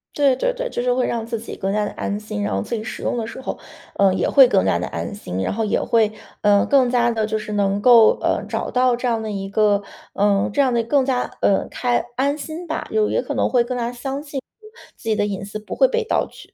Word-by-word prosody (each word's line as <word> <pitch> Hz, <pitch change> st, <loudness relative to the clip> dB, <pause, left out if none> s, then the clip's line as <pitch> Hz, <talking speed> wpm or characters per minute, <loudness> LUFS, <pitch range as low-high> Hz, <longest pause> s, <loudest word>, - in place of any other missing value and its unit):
对， 280 Hz, -3 st, +3 dB
对 -, -, 0 dB
对， -, -, -4 dB
就 -, -, -5 dB
是 250 Hz, -, +2 dB
会 250 Hz, 0 st, 0 dB
让 230 Hz, -1 st, -2 dB
自 230 Hz, 0 st, -4 dB
己 225 Hz, -, -8 dB
更 195 Hz, 0 st, -2 dB
加 210 Hz, 0 st, +1 dB
地 -, -, -4 dB
安 205 Hz, +1 st, -3 dB
心。 215 Hz, -1 st, -5 dB
然 205 Hz, -, -1 dB
后 -, -, 0 dB
自 235 Hz, -, -4 dB
己 215 Hz, -, -4 dB
使 220 Hz, -, -7 dB
用 -, -, -1 dB
的 230 Hz, -, -2 dB
时 230 Hz, +3 st, -8 dB
候， -, -, -4 dB, 0.4 s
呃， 195 Hz, -1 st, +4 dB
也 -, -, 0 dB
会 270 Hz, -3 st, +7 dB
更 -, -, +2 dB
加 -, -, +2 dB
地 -, -, -3 dB
安 -, -, -5 dB
心， 95 Hz, -, -5 dB
然 -, -, -1 dB
后 220 Hz, +2 st, -1 dB
也 210 Hz, -, 0 dB
会 220 Hz, -2 st, +2 dB, 0.3 s
呃， 205 Hz, -1 st, +4 dB
更 270 Hz, -3 st, +4 dB
加 240 Hz, -1 st, +2 dB
地 225 Hz, -2 st, 0 dB
就 215 Hz, 0 st, -2 dB
是 210 Hz, 0 st, -6 dB
能 200 Hz, 0 st, 0 dB
够， 230 Hz, -2 st, +7 dB
呃， -, -, 0 dB
找 -, -, -3 dB
到 250 Hz, -1 st, +2 dB
这 245 Hz, +1 st, -3 dB
样 230 Hz, -2 st, 0 dB
的 215 Hz, -, -4 dB
一 195 Hz, -1 st, -4 dB
个， 205 Hz, -1 st, +2 dB, 0.3 s
呃， 200 Hz, 0 st, +2 dB
这 285 Hz, -, +3 dB
样 260 Hz, -2 st, +2 dB
的 235 Hz, -1 st, +1 dB
更 275 Hz, +4 st, +2 dB
加 255 Hz, -1 st, 0 dB, 0.2 s
呃， 195 Hz, -, +2 dB
开 245 Hz, -1 st, 0 dB
安 280 Hz, +3 st, 0 dB
心 325 Hz, +3 st, -7 dB
吧。 320 Hz, -, -4 dB
就 430 Hz, -1 st, +2 dB
也 -, -, 0 dB
可 -, -, -4 dB
能 -, -, +1 dB
会 245 Hz, -2 st, +3 dB
更 250 Hz, +1 st, -4 dB
加 240 Hz, -1 st, -2 dB
相 270 Hz, +3 st, -5 dB
信 285 Hz, -2 st, -5 dB, 0.6 s
自 225 Hz, -, -7 dB
己 215 Hz, -, +2 dB
的 205 Hz, -1 st, +1 dB
隐 200 Hz, -2 st, -4 dB
私 205 Hz, +2 st, -6 dB
不 215 Hz, -, -8 dB
会 -, -, +5 dB
被 475 Hz, -1 st, -1 dB
盗 445 Hz, -, 0 dB
取。 -, -, -15 dB
235 Hz, 295 characters per minute, -21 LUFS, 210-260 Hz, 0.6 s, 会